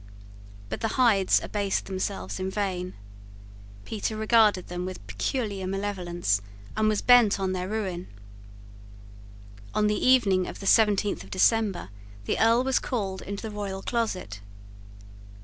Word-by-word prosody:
But - - -5
the 225 - -1
Hydes 215 -7 +4
abased 200 -2 -1
themselves 190 0 -4
in 185 0 -2
vain. 185 -2 -3 0.9
Petre 220 0 -3
regarded 215 -4 +3
them 180 0 -4
with 185 - -7
peculiar 195 - -3
malevolence, 180 - -1 0.3
and 215 0 +2
was 210 -1 0
bent 240 -5 +6
on 190 -1 -1
their 185 0 -3
ruin. 190 -5 -3 1.7
On 210 - +2
the 210 0 0
evening 200 -8 +4
of - - -8
the 195 - -8
seventeenth 205 -1 +3
of - - -14
December 200 - +1 0.4
the - - -1
Earl 230 +2 +4
was 265 0 +2
called 195 -6 -3
into 200 +2 -6
the - - -7
royal 195 -2 -5
closet. 185 - -2
200 Hz, 135 wpm, -26 LUFS, 185-220 Hz, 1.7 s, bent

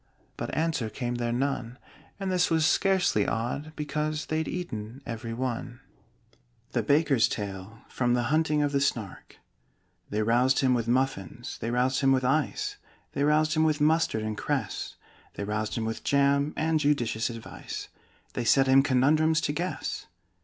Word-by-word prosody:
But - - -4
answer 155 -8 0
came 120 +1 -3
there 120 0 0
none 125 -1 -2 0.4
And 195 -1 -2
this 180 -1 +2
was 160 -1 +3
scarcely 180 - +2
odd, 125 +7 -2
because 150 0 -2
They'd 160 0 -1
eaten 130 -7 -5
every 115 0 -5
one. 120 0 -3 0.9
THE - - +1
BAKER'S 145 -5 +3
TALE 100 +3 -6
From 120 -1 +1
'The 120 - +1
Hunting 155 -1 +2
of 145 - 0
the 140 -1 +1
Snark' 115 -7 -3 0.7
They 105 +1 0
roused 125 +4 +3
him 130 -2 +3
with 115 -2 0
muffins 120 -2 -1
they 115 - -3
roused 125 +2 +1
him 135 -1 +3
with 130 -1 +2
ice 410 - 0 0.4
They 140 - 0
roused 155 +1 +3
him 155 - +3
with 155 -1 +2
mustard 150 -7 +2
and 110 0 -2
cress - - -3 0.4
They - - -4
roused 105 +1 -2
him 115 - -2
with 115 0 -4
jam 140 +1 +2
and 160 0 +1
judicious 125 -6 +1
advice 115 -1 -7 0.5
They 120 - -2
set 135 +4 +4
him 135 +1 +6
conundrums 150 +4 +3
to 145 - -1
guess. 175 +4 -3
135 Hz, 160 wpm, -28 LUFS, 115-155 Hz, 0.9 s, him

